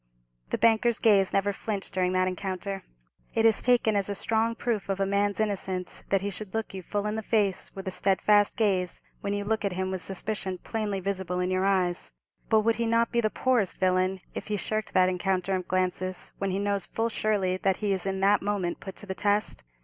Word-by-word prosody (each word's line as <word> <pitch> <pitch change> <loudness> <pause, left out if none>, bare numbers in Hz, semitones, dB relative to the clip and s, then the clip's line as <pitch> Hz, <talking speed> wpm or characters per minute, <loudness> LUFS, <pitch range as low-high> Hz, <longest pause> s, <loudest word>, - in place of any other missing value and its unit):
The - - 0
banker's 230 0 +3
gaze 200 -4 +4
never 200 +1 +1
flinched 200 -1 -4
during 185 -1 +1
that 185 0 +2
encounter. 190 +1 -4 0.5
It 225 0 +3
is 225 -2 +5
taken 240 -3 +3
as 200 0 0
a 200 - -2
strong 225 +3 0
proof 230 -5 -2
of 195 0 -1
a 195 - +2
man's 200 +1 +1
innocence 190 -4 -1
that 195 -1 +2
he 200 +1 -2
should 205 +1 -7
look 225 -2 -2
you 190 - -5
full 205 +3 -3
in 210 +1 -1
the 220 - -2
face 205 -3 +1
with 195 0 -7
a - - -1
steadfast 205 +2 +3
gaze 190 -5 0 0.2
when 200 0 -2
you 205 - -2
look 220 +1 0
at 200 -2 0
him 185 +1 -2
with 190 -1 -3
suspicion 195 0 -3
plainly 210 -1 -3
visible 185 -2 -2
in 180 +1 0
your 185 +1 +1
eyes; 180 -3 0 0.4
but 220 -1 +5
would 225 +1 +1
he 235 0 0
not 230 0 +2
be 235 - +2
the 215 - +1
poorest 240 -5 +1
villain 185 0 +1
if - - -6
he 210 -1 -1
shirked 215 +2 -3
that 185 0 +6
encounter 185 +1 0
of 185 -1 -4
glances 185 0 -1
when 195 - -1
he 190 - -1
knows 200 -1 -1
full 225 +1 -1
surely 200 -4 0
that 190 0 +1
he 205 -2 0
is 190 0 -1
in 190 0 -2
that 200 +1 +4
moment 195 -4 -1
put 190 - -8
to - - -6
the 190 - -3
test? 205 +2 0
195 Hz, 225 wpm, -27 LUFS, 185-215 Hz, 0.5 s, that